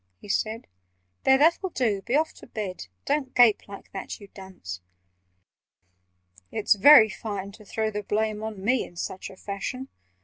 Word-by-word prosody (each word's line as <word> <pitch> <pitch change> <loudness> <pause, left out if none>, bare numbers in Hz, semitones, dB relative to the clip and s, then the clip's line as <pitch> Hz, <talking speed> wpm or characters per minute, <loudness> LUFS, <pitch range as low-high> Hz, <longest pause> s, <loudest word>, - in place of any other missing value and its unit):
he - - -13
said. 220 +3 -1 0.6
"There, 265 0 +6
that'll 335 +6 +3
do—be 235 - -1
off 315 +2 +1
to - - -15
bed! 195 - -6 0.2
Don't 280 -3 -1
gape 240 -4 +5
like 200 -1 -11
that, 195 - -6
you 200 -2 -13
dunce!" 185 - -9 1.7
"It's 215 -2 +3
very 220 +2 +8
fine 200 -1 -5
to 215 +1 -15
throw 220 +2 -2
the 210 0 -3
blame 215 +1 -1
On 215 -3 -6
me 250 +2 +2
in 175 - -12
such 185 +3 -5
a 190 - -14
fashion! 255 +8 -5
215 Hz, 160 wpm, -26 LUFS, 195-245 Hz, 1.7 s, very